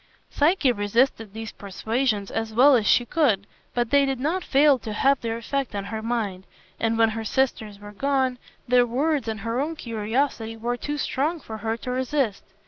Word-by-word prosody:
Psyche 300 -2 +3
resisted 225 +1 +1
these 220 +1 -7
persuasions 215 +1 -2
as 225 0 -2
well 270 +3 +7
as 220 -4 +1
she 245 - +4
could, 235 -9 +1 0.3
but 240 -1 0
they 280 0 +5
did 270 -2 -1
not 330 +7 -1
fail 280 -1 +4
to 220 -2 -6
have 275 +5 +2
their 230 -1 -2
effect 265 0 -3
on 200 - -2
her 220 +1 -4
mind, 215 -5 -2 0.3
and 225 0 +1
when 225 -1 +4
her 225 0 -4
sisters 220 -4 -1
were 205 0 -10
gone, 260 +2 0 0.3
their 245 0 +4
words 275 +2 0
and 220 -2 -3
her 230 +3 -2
own 320 +3 -2
curiosity 225 -1 -2
were 240 +2 -2
too 295 +4 -4
strong 300 +4 -1
for 220 -6 -8
her 225 +1 -2
to 250 - -5
resist. 255 -3 -1
240 Hz, 190 wpm, -24 LUFS, 220-275 Hz, 0.3 s, well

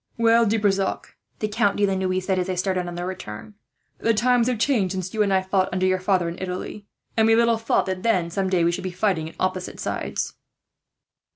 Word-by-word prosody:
"Well, 230 0 +4
De 220 +2 +2
Brissac," 195 -2 -1 0.2
the 215 - -1
Count 210 -1 +1
de 205 - +3
la 195 - 0
Noue 185 -1 0
said, 185 0 -1
as 180 - -1
they 185 - -1
started 185 0 -1
on 175 - -6
their 175 +1 -4
return, 180 - -7 0.5
"the 230 -1 +2
times 245 +2 +3
have 250 -2 0
changed 215 -6 +1
since 185 -1 -4
you 220 - 0
and 200 -2 +2
I 190 -1 +3
fought 190 0 +1
under 185 +1 0
your 185 0 +2
father 185 -2 +1
in 170 +2 -6
Italy; 185 +2 -5 0.3
and 220 -1 +4
we 225 - +5
little 235 0 +3
thought, 225 - +1
then, 185 -1 -3
that 185 -7 +1
some 190 0 0
day 180 -2 +2
we 170 - +3
should 185 +2 -4
be 185 - -2
fighting 180 -3 0
on - - -17
opposite 185 -1 -2
sides." - - -3
190 Hz, 230 wpm, -24 LUFS, 185-215 Hz, 0.5 s, we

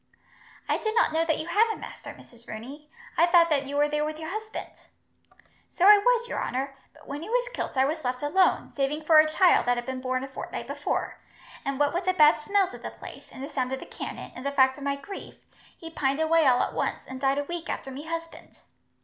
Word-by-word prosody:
"I - - +1
did 435 0 -2
not 460 - +3
know 325 +1 +2
that 320 -2 +1
you 315 - -4
had 420 +7 +3
a - - -4
master, - - -9
Mrs. 235 -1 -17
Rooney. 275 +8 -9 0.3
I 340 - +5
thought 340 -1 +5
that 280 -2 +1
you 285 - -5
were 290 +1 +3
there 300 0 -1
with 305 0 -3
your 315 +1 -6
husband." 435 +1 -6 1.0
"So 360 - 0
I 415 0 +9
was, 475 +2 +2
your - - -3
honour; 270 +2 -3 0.2
but - - -19
when 285 +2 -5
he 335 - -7
was - - +1
kilt 285 - -4
I 265 - +5
was 310 +2 -2
left 250 +1 -2
alone, 370 +6 +2
saving 285 +2 -1
for 310 0 +7
a 310 0 +5
child 350 -1 +4
that 245 0 +3
had 240 - -4
been 260 0 -4
born 255 0 -1
a - - -5
fortnight 265 - -6
before; - - -3 0.4
and 275 0 -3
what 290 +1 +2
with 350 +1 -2
the 370 - +2
bad 305 -3 +6
smells 390 +3 +1
of - - -10
the - - -5
place, - - -12
and 260 - -9
the 280 - -6
sound 255 -1 -1
of 265 - -3
the - - -9
cannon, - - -7
and 255 - -8
the 280 - -1
fact 265 -1 +3
of - - -8
my 280 0 0
grief, 335 +8 -9 0.4
he 330 -1 -9
pined 275 -2 0
away 320 -1 +3
all 250 -1 +4
at - - -3
once, - - -2
and 260 0 -8
died 270 0 +2
a 285 - 0
week 340 +2 -6
after 270 - -4
me 285 +4 -8
husband. 330 0 -7
300 Hz, 250 wpm, -27 LUFS, 270-345 Hz, 1.0 s, I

